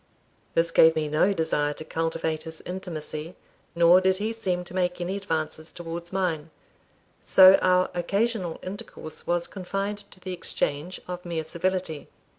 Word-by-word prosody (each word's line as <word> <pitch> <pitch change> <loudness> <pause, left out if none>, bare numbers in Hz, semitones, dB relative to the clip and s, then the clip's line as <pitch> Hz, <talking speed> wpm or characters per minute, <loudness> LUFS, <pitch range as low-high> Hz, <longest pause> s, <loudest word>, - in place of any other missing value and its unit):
This 165 0 +2
gave 160 0 +6
me 155 -1 0
no 155 +6 +3
desire 160 -5 0
to 155 - -7
cultivate 160 -1 -2
his 160 0 -8
intimacy, 165 -3 -6 0.4
nor 170 +2 +6
did 190 0 +3
he 215 +3 -2
seem 185 -6 -1
to 175 - -13
make 180 -1 0
any 180 +2 -2
advances 160 -4 -3
towards 170 0 -6
mine; 170 -5 -1 0.7
so 190 0 +8
our 185 0 +3
occasional 195 0 -1
intercourse 185 -4 -7
was 175 0 +1
confined 195 +2 -3
to - - -13
the 185 0 -5
exchange 175 -1 -2
of 180 0 -5
mere 170 -2 -3
civility. 170 -1 -2
175 Hz, 150 wpm, -26 LUFS, 160-185 Hz, 0.7 s, so